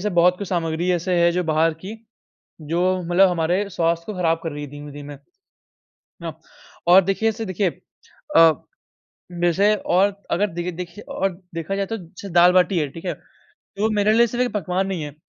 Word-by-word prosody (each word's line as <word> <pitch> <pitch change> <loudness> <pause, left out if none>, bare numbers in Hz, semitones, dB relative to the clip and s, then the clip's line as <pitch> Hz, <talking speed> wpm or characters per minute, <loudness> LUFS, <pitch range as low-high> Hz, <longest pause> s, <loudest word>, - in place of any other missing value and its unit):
सब 210 0 -2
बहुत 180 +1 +4
कुछ 200 - -5
सामग्री 170 0 -1
ऐसे 180 +1 -1
है 170 0 +5
जो 180 +1 0
बाहर 160 +1 +2
की 210 +3 -6 0.7
जो 165 +3 -2 0.2
मतलब 180 +3 +4
हमारे 180 +4 0
स्वास्थ्य 170 -2 0
को 215 - -5
खराब 165 -2 +1
कर 165 - -3
रही 145 0 -6
है 145 - -7
धीमे-धीमे 145 0 -9 1.1
ना - - -4 0.6
और 180 +2 +9
देखिए 195 +4 +1
ऐसे 220 +1 -3
देखिए 190 0 0 0.7
अ, 165 -1 +8 0.9
वैसे 195 +5 +3
और 195 0 +1 0.2
अगर 205 +4 +2
देखे 175 +1 -3
देखिए 175 +3 -8
और 195 0 +1 0.2
देखा 165 +3 -3
जाए 195 0 -1
तो 225 +3 -4
जैसे 185 +2 -11
दाल-बाटी 180 +1 +5
है, 150 - 0
ठीक 165 +6 -11
है, 175 - -1 0.4
तो 215 +2 -3
मेरे 205 +1 +3
लिए 235 +1 +5
सिर्फ़ 245 +2 -1
एक 245 - -3
पकवान 190 -1 -1
नहीं 185 -5 -3
है, 145 -2 -7
180 Hz, 185 wpm, -22 LUFS, 165-195 Hz, 1.1 s, और